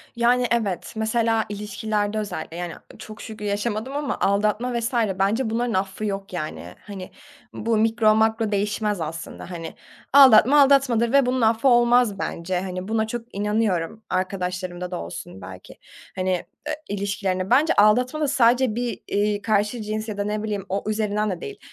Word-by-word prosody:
Yani, 245 +1 +3
evet, 220 -6 -1
mesela, 225 0 +1
ilişkilerde 210 0 -2
özellikle, 200 -5 -5
yani, 175 -1 -4 0.3
çok 215 0 -10
şükür 215 -2 -8
yaşamadım 215 +5 -2
ama 290 -1 -2
aldatma 215 +5 +1
vs. 235 +3 -3 0.3
bence 220 +5 +1
bunların 235 +1 -1
affı 190 +2 -2
yok, 195 -1 -4
yani. 155 - -6
Hani, 190 -3 -8 0.4
bu 225 0 0
mikro, 220 0 +3
makro 220 0 +1
değişmez. 205 -1 -1
Aslında 165 +3 -6
hani 165 -2 -7 0.4
aldatma, 275 +1 +8
aldatmadır. 260 -4 +4
Ve 275 -1 +5
bunun 255 0 0
affı 225 +3 +3
olmaz, 240 -4 +4
bence, 180 +2 -2
hani, 185 0 -5
buna 220 0 0
çok 235 -1 -7
inanıyorum, 210 -1 -1
arkadaşlarımda 185 -1 -3
da 175 - -3
olsun 95 +2 -8
belki, - - -11 0.4
hani, 185 0 -1 0.4
eee, 305 - -1
ilişkilerini 195 -2 -2
Bence, 285 +6 +4
aldatma 245 +8 +3
da 300 - +2
sadece 250 -3 +3
bir, 240 0 -3
iii, 205 0 0
karşı 215 +1 0
cins, 215 +1 -4
ya 205 - -5
da 205 - 0
ne 210 +1 -2
bileyim, 205 -3 -3
o 195 +1 -2
üzerinden 210 -1 0
de 180 - -5
değil, 415 -1 -7
215 Hz, 160 wpm, -23 LUFS, 195-235 Hz, 0.4 s, aldatma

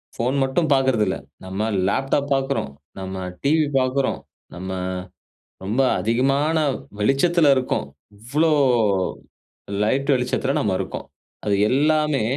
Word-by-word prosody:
Phone 125 +4 0
மட்டும் 145 +5 0
பாக்குறதில்ல. 125 -8 +2 0.3
நம்ம 95 +4 -2 0.2
laptop 135 +6 0
பாக்குறோம், 135 - -1 0.3
நம்ம 95 0 -5 0.3
டிவி 155 +2 +3
பாக்குறோம், 130 +1 0 0.4
நம்ம 95 +2 -6 0.9
ரொம்ப 110 +8 0 0.2
அதிகமான 135 - +1 0.4
வெளிச்சத்துல 145 +7 +3
இருக்கோம். 125 - -1 0.3
இவ்ளோ 145 +9 +1 1.3
லைட் 135 +6 +1
வெளிச்சத்துல 130 +2 -1
நம்ம 100 -3 0
இருக்கோம். - - -5 0.4
அது 105 -1 +2
எல்லாமே 150 -1 +2
130 Hz, 100 wpm, -22 LUFS, 110-140 Hz, 1.3 s, டிவி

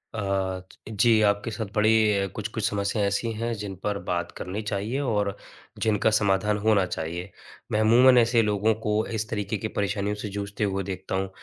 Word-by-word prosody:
अ, - - -3
ज 95 0 -3
जी 115 -2 +5
आपके 105 +2 +1
साथ 110 +1 -3
बड़ी 105 -2 +3
कुछ-कुछ 110 0 -3
समस्याँ 100 +1 -1
ऐसी 105 +3 -1
हैं 115 +2 -2
जिन 100 -2 -5
पर 105 -1 -1
बात 85 -1 -1
करनी 100 +4 -4
चाहिए 105 +5 -2
और 105 -7 0 0.5
जिनका 110 0 +2
समाधान 105 +1 +1
होना 105 -4 +4
चाहिए। 85 +3 -5 0.4
मैं 105 - +1
अमूमन 125 +3 +6
ऐसे 115 0 +4
लोगों 105 +1 +2
को 105 +1 +1
इस 110 +2 -3
तरीके 105 0 -2
की 110 +3 -3
परेशानियों 100 0 -1
से 105 0 -5
जूझते 100 +1 -4
हुए 95 -1 -1
देखता 95 0 -4
हूँ। 95 0 -1
105 Hz, 180 wpm, -26 LUFS, 100-110 Hz, 0.5 s, अमूमन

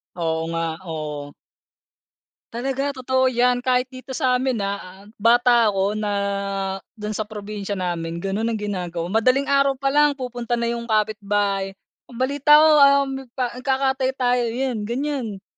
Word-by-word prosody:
Oo 165 -2 -1
nga, 165 0 -1 0.2
oo. 150 -3 -5 1.2
Talaga 270 +3 -2
totoo 260 0 +1
yan 250 0 +2
kahit 250 +1 0
dito 260 0 -8
sa'min 255 -2 +1
na 200 -2 -5 0.2
bata 240 +1 +5
o 195 0 +1
na 210 -1 -2 0.8
dun 210 -1 -5
sa 215 0 -3
probinsya 205 -1 -5
namin 170 -2 -3
ganon 200 +3 -1
ang 230 - -1
ginagawa. 180 -4 -4
Madaling 255 +6 +2
araw 275 -1 +3
pa 275 +1 -1
lang 295 0 +4
pupunta 245 -2 -3
na 235 0 -1
yung 235 0 -4
kapitbahay 205 -3 0 0.3
ang 245 - -14
balita 280 +4 +4
ko, 310 +1 +7 0.4
um, 270 -1 -4 0.2
ka 250 -2 -1
nagkakatay 265 0 +1
tayo 250 -1 +1
yun 235 -3 -2
ganyan 240 -5 -3
235 Hz, 145 wpm, -22 LUFS, 200-260 Hz, 1.2 s, ko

